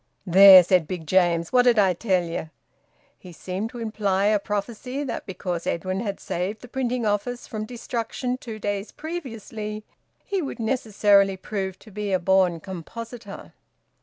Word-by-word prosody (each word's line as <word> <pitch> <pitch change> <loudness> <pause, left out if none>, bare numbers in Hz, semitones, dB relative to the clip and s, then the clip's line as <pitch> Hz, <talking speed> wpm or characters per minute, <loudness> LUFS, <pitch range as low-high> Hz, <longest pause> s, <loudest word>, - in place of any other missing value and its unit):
"There!" 190 0 +9
said 175 -2 +2
Big 175 -3 -5
James. 170 +1 +2
"What 250 - +6
did 245 -2 +4
I 195 -3 +4
tell 185 -1 +1
ye?" 165 -1 -5 0.7
He 180 - -12
seemed 185 +6 -4
to 245 - -10
imply 210 -4 0
a 210 0 +3
prophecy 225 +7 -4
that, 275 - -5
because 180 -2 -4
Edwin 185 +2 -2
had 200 -3 -4
saved 190 +5 -3
the - - -9
printing 250 -1 -2
office 215 +4 -1
from 215 -1 -5
destruction 245 +1 -4
two 225 -4 -7
days 205 0 -3
previously, 225 - -6 0.4
he 395 -2 -1
would 275 - -5
necessarily 205 -5 +2
prove 190 -1 -4
to 215 - -16
be 205 0 -4
a 190 - +3
born 185 -2 +2
compositor. 205 +4 -9
205 Hz, 160 wpm, -24 LUFS, 185-230 Hz, 0.7 s, There